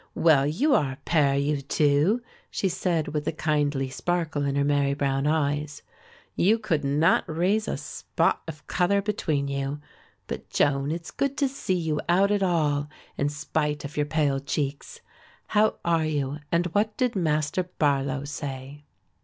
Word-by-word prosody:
"Well, 145 -4 +4
you 265 - +2
are 135 - +2
a 130 - -14
pair, 145 -4 +3
you 140 0 0
two," 150 - +2 0.3
she 195 - -1
said, 170 -3 -1
with 150 -1 -3
a - - +2
kindly 145 -4 0
sparkle 165 -1 -1
in 140 0 -1
her 140 - +2
merry 140 -1 +2
brown 140 0 0
eyes; 150 -1 -1 0.5
"you 210 +6 +4
could 170 -10 -1
not 145 +4 +3
raise 190 +7 +1
a - - -2
spot 165 +3 -1
of 155 -2 -8
colour 195 +2 +1
between 155 -9 -1
you; 140 +1 -3 0.5
but, - - -6
Joan, 140 0 +1
it's 170 +1 -5
good 275 +1 -1
to 280 - +2
see 260 -8 -2
you 160 -3 -1
out 195 +4 +4
at 205 -1 +2
all, 150 -5 +1 0.3
in 140 - 0
spite 150 0 -2
of 145 - -8
your 150 0 0
pale 145 -3 +1
cheeks. 145 - -4 0.5
How 215 0 +3
are 165 -2 +2
you 145 -1 -2
and 170 +1 +2
what 210 +1 +1
did 250 -3 +1
Master 155 -1 +1
Barlow 140 -5 0
say?" 140 0 -6
150 Hz, 165 wpm, -26 LUFS, 140-175 Hz, 0.5 s, Well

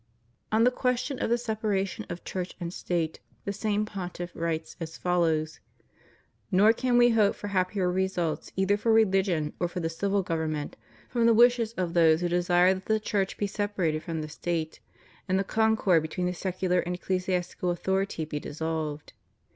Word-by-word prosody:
On 220 +1 +4
the 250 - +5
question 250 +2 -1
of - - -1
the 235 - +3
separation 215 -5 -2
of 175 - -6
Church 180 -1 -4
and 170 -1 -4
State 165 -4 -2 0.3
the 200 - -2
same 210 0 0
Pontiff 180 -4 -6
writes 165 -1 -3
as 165 -1 -6
follows: 160 -3 0 0.9
"Nor 205 +4 +6
can 245 +1 +1
We 240 0 +6
hope 215 -3 +3
for 205 - -6
happier 185 0 0
results 180 -3 -1
either 190 +2 +2
for 225 +2 +1
rehgion 190 -8 +2
or 175 - +1
for 175 - -5
the 165 -1 -2
civil 200 +3 0
government 160 -3 -2 0.3
from 235 -2 +2
the 230 - +5
wishes 235 -1 +4
of 180 -5 -2
those 165 -1 +5
who 175 - 0
desire 175 +1 +4
that 190 0 -8
the 220 0 +2
Church 200 -2 -1
be 205 - 0
separated 195 -6 -1
from 165 -2 -4
the 155 - -5
State, 160 +1 -3 0.5
and 185 - +3
the 195 - +1
concord 220 -5 +3
between 160 +3 -3
the 180 - 0
secular 180 0 0
and 180 +1 -2
ecclesiastical 180 -1 -2
authority 190 -1 -1
be 150 -1 -4
dissolved. 155 -1 -4
185 Hz, 175 wpm, -28 LUFS, 170-205 Hz, 0.9 s, Nor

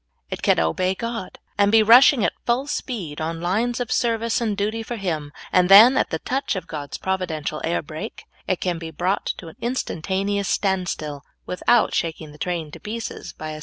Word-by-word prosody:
It - - -4
can - - +3
obey 185 - +1
God 230 -3 -5 0.2
and 200 0 +4
be 220 0 +6
rushing 235 +1 +7
at - - 0
full 245 +3 +1
speed 200 - -4
on 165 +1 -3
lines 220 +8 0
of 245 - -3
service 230 -1 +1
and 215 -4 -1
duty 215 +3 -1
for 240 +2 -5
Him, 160 -8 -3 0.2
and 180 0 +4
then, 220 +7 +9
at - - +1
the 160 - -1
touch 265 - -2
of 185 - -4
God's 145 -2 -6
providential 170 -5 -3
air 165 0 0
brake, 155 +1 -7 0.2
it 185 - 0
can 175 -2 -2
be 165 -1 -6
brought 180 +4 -1
to 170 - -9
an 160 - -12
instan 240 -8 -2
taneous 195 +2 -1
standstill, 180 -8 -1 0.2
without 235 +6 +2
shaking 160 -2 -2
the 150 - -15
train 170 -3 -3
to - - -10
pieces 225 +2 -6
by 155 0 -7
a 155 - -7
190 Hz, 200 wpm, -23 LUFS, 160-225 Hz, 0.2 s, then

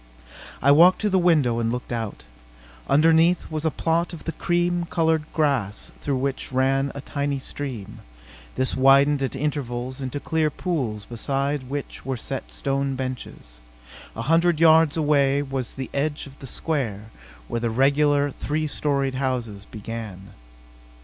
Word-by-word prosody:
I 140 - +6
walked 170 +5 +7
to 210 -1 +1
the 190 - +4
window 150 -10 +3
and 115 0 0
looked 125 +1 -5
out. 115 -3 -4 0.7
Underneath 165 +4 +4
was 155 0 -3
a - - +4
plot 165 +2 0
of 160 - -8
the 165 - -3
cream 175 +1 0
colored 160 -2 +1
grass 135 -10 0
through 140 -2 -1
which 135 +1 -3
ran 135 +1 +1
a 140 - -5
tiny 140 0 -2
stream. 130 -6 -6 0.6
This 130 0 0
widened 135 +2 +5
at 135 0 -2
intervals 130 -2 -3
into 130 +2 -3
clear 160 +1 0
pools 130 - -3
beside 135 +3 -2
which 145 0 -5
were 130 -1 -3
set - - -6
stone 135 - -1
benches. 125 - -6 0.5
A 115 - -4
hundred 165 +3 +3
yards 160 -1 +5
away 145 -2 +3
was 135 -3 -4
the 135 -1 -6
edge 145 +2 -1
of 140 -1 -14
the 135 - -8
square, 115 -8 -3 0.4
where 115 - -2
the 120 0 -1
regular, 140 +3 +3
three 155 +3 -2
storied 140 -2 0
houses 125 -6 -2
began. 105 -3 -7
140 Hz, 150 wpm, -24 LUFS, 125-155 Hz, 0.7 s, walked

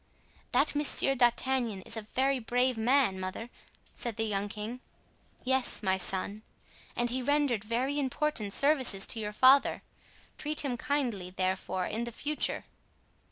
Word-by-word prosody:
"That 290 - +3
Monsieur 290 -2 +3
d'Artagnan 240 -4 +1
is - - -2
a 225 - -4
very 265 +5 0
brave 250 +2 0
man, 230 -3 +2
mother," 190 +6 -6 0.4
said 235 -4 -5
the 225 - -1
young 205 -2 -2
king. 215 +4 -6 0.6
"Yes, 260 -3 +1
my 190 -1 +2
son; 195 +3 +1 0.5
and 240 0 -1
he 260 +1 -1
rendered 280 -5 +1
very 255 +6 -1
important 270 -5 -1
services 260 -7 +2
to 225 - 0
your 210 -1 -3
father. 260 +6 +4 0.6
Treat 305 0 0
him 255 -3 -1
kindly, 240 -8 -2
therefore, 185 0 -2
in 230 +2 -3
the 235 - -6
future." 295 +6 -2
240 Hz, 145 wpm, -30 LUFS, 210-270 Hz, 0.6 s, father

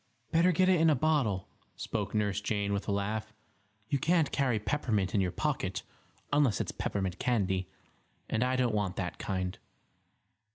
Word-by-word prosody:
"Better 170 +3 +5
get 185 +2 +3
it 185 -3 +4
in 165 - +6
a 150 - +4
bottle," 125 - +1 0.3
spoke 105 -2 -3
Nurse 105 -1 +1
Jane, 100 -1 -1
with 100 - -2
a - - 0
laugh. 105 +2 -2 0.5
"You 140 - 0
can't 165 +1 +2
carry 130 -5 +1
peppermint 105 -5 0
in 100 - +3
your 90 - +1
pocket, 95 - -2 0.5
unless 145 -7 +3
it's - - -2
peppermint 95 -3 -2
candy, 95 -6 0 0.6
and 115 +1 +1
I 130 +1 +1
don't 125 -3 +1
want 100 -4 0
that 90 -2 -4
kind." 95 -2 -2
105 Hz, 165 wpm, -31 LUFS, 100-140 Hz, 0.6 s, in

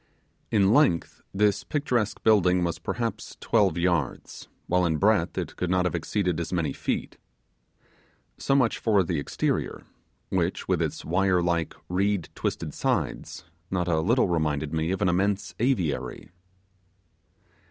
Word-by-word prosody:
In 100 -1 +3
length 130 - +2
this 105 0 +1
picturesque 125 -8 -1
building 90 -5 +4
was 85 -1 -2
perhaps 115 -2 -4
twelve 80 - +2
yards, 85 -6 -1 0.2
while 90 +1 +2
in 80 -3 +1
breadth 100 -2 +2
it - - -3
could 90 - -2
not 90 0 +2
have 90 - 0
exceeded 90 0 -1
as 85 - -4
many 85 -6 -1
feet. - - -3 1.2
So 135 - +1
much 125 -4 +2
for 105 -4 +3
the 85 -2 -2
exterior; 70 - -2 0.5
which, - - -1
with - - +1
its - - -3
wire 90 +1 +2
like 85 -2 -1
reed 95 -2 0
twisted - - -3
sides, - - -2 0.3
not 90 -2 -1
a 80 -2 +2
little 115 +10 +2
reminded 80 -3 -1
me 80 +1 0
of 95 0 -1
an - - +3
immense 100 +3 0
aviary. 110 - -1
90 Hz, 140 wpm, -26 LUFS, 85-105 Hz, 1.2 s, building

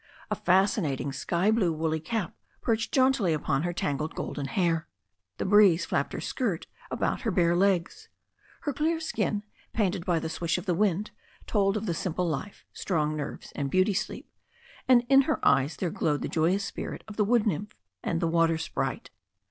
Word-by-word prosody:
A - - +2
fascinating 180 - +1
sky 175 +8 +1
blue 210 -6 +2
woolly 160 0 -1
cap 205 +2 -3 0.3
perched 225 -1 0
jauntily 260 - +3
upon 140 -2 0
her 175 +2 -1
tangled 155 -1 -2
golden 145 -2 -4
hair. 165 0 0 0.5
The - - -2
breeze 195 -3 +5
flapped - - -1
her - - -3
skirt - - -2 0.2
about - - -1
her 240 - -1
bare 175 -3 +3
legs. 195 - +1 0.5
Her 290 - -2
clear 320 +4 0
skin, 215 -9 -1 0.3
painted 195 -5 0
by 175 -1 +1
the 160 - -2
swish 165 +1 -1
of - - -6
the 180 - +1
wind, 200 +2 +1 0.3
told 200 -1 +2
of 215 - -4
the 175 - 0
simple 180 +1 -2
life, 165 +6 -4
strong 155 -4 -1
nerves 150 -2 -6
and 140 -1 -2
beauty 185 +6 +3
sleep, 215 +3 -3 0.6
and 245 -2 +5
in 270 +1 +7
her 310 - +1
eyes 140 +2 +3
there 175 -3 -2
glowed 150 -2 0
the - - -1
joyous 180 +5 +1
spirit - - -6
of 215 - -9
the 210 - +2
wood 230 +1 +3
nymph 210 0 -2 0.3
and 165 - -1
the 170 - +1
water 165 0 +3
sprite. 160 - -3
185 Hz, 180 wpm, -28 LUFS, 160-210 Hz, 0.6 s, in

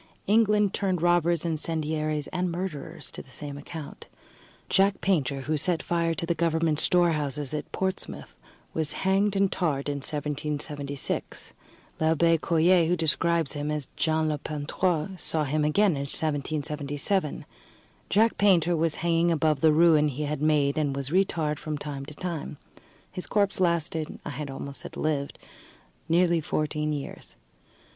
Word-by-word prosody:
England 210 -1 +3
turned 190 -3 0
robbers, 175 -1 +3
incendiaries, 155 -2 -1
and 180 -1 -1
murderers 170 -2 -5
to - - -7
the - - -18
same 145 +2 -7
account. 145 +1 -9 0.6
Jack 195 +1 +3
Painter, 145 -8 0
who 155 +4 -1
set 170 +2 0
fire 170 -1 0
to 170 - -3
the 170 - +1
government 160 -2 +1
storehouses 150 -6 +1
at 150 - -4
Portsmouth, 190 - -2 0.4
was 155 -2 -1
hanged 195 +1 +1
and 195 -1 +2
tarred 145 -6 -1
in 145 -1 -1
1776. 145 -1 -4 0.5
L'Abbé 165 +1 +3
Coyer, 170 +1 +4
who 175 - +2
describes 165 -1 +1
him 145 0 -3
as 150 -3 -2
Jean 160 0 +1
le 150 -1 -1
Peintre, 155 +4 -1
saw 160 -3 -1
him 150 +2 0
again 195 +7 +3
in 145 - -2
1777. 150 +2 -1 0.6
Jack 220 +3 +3
Painter 175 -4 +4
was 165 -1 +1
hanging 170 0 +3
above 155 -3 +1
the 160 - +6
ruin 155 -1 +5
he 145 +1 -3
had 150 0 -3
made, 150 -1 +2
and 145 -3 0
was 140 0 -4
re 190 +3 +5
tarred 155 -5 -2
from 155 -1 -4
time 140 -2 -6
to 150 - -9
time. 165 -4 -5 0.5
His 180 - -5
corpse 200 -2 +1
lasted 165 -3 0
I - - -4
had 145 -1 -5
almost 140 +1 -3
said - - -8
lived 145 -2 -1 0.7
nearly 170 0 +3
fourteen 150 0 -1
years. 145 -2 -6
155 Hz, 150 wpm, -27 LUFS, 150-175 Hz, 0.7 s, the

